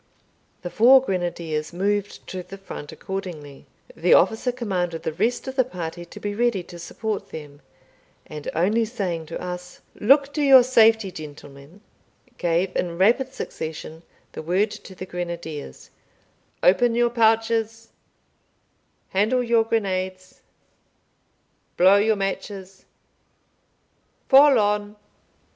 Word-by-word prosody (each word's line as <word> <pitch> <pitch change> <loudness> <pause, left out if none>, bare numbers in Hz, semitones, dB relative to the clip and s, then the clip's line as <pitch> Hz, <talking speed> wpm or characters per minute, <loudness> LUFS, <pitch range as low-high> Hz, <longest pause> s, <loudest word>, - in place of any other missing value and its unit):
The 175 - -5
four 255 +4 +7
grenadiers 170 -6 -3
moved 200 +3 -2
to 185 - -5
the 195 +2 -11
front 170 -6 -9
accordingly. 170 -8 -7 0.3
The 175 +2 +4
officer 220 +6 +2
commanded 185 -9 -3
the - - -3
rest 225 - -1
of 265 - -5
the 260 - +4
party 175 -6 -7
to - - -12
be 205 0 -4
ready 230 -4 0
to 175 0 -12
support 215 +4 -5
them, 145 -2 -10 0.6
and 150 -1 -7
only 205 +8 +2
saying 185 -8 -4
to 165 - -6
us, 180 0 -7
"Look 280 +5 +3
to 300 - -1
your 270 -3 +8
safety, 225 -5 +4
gentlemen," 145 +2 -12 0.6
gave, 175 +2 0
in 170 -1 -2
rapid 240 +8 +3
succession, 160 - -7 0.3
the - - -7
word 185 +6 0
to 190 - -11
the 185 - -7
grenadiers 170 - -7 0.7
"Open 230 +6 +4
your 240 0 +2
pouches 225 0 +1 1.2
handle 220 +6 +1
your 235 -1 +3
grenades 185 -4 -3 1.4
blow 190 +3 +6
your 215 +2 +2
matches 195 -1 -5 1.4
fall 275 0 +7
on." 210 0 0
195 Hz, 120 wpm, -23 LUFS, 175-225 Hz, 1.4 s, your